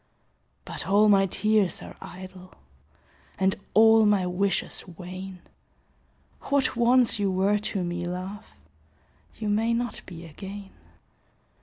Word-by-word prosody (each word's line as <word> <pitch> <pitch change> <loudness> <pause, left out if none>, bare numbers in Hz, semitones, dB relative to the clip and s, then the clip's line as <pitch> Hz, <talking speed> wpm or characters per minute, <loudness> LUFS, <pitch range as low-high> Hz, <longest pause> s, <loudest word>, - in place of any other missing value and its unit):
But - - -6
all 205 +2 +5
my 195 -1 +5
tears 210 0 +1
are - - -10
idle, 185 0 -11 0.8
And 190 0 +2 0.2
all 220 0 +7
my 200 -3 +3
wishes 185 +2 -1
vain. 185 +1 -9 1.1
What 280 -2 +2
once 240 -1 +4
you 200 -1 +1
were 195 +3 +2
to 200 -2 -3
me, 175 0 -3
love, 185 +3 -6 0.9
You 215 - -4
may 225 +3 +2
not 240 -1 -3
be 170 -2 -9
again. 195 +5 -9
195 Hz, 120 wpm, -26 LUFS, 185-215 Hz, 1.1 s, all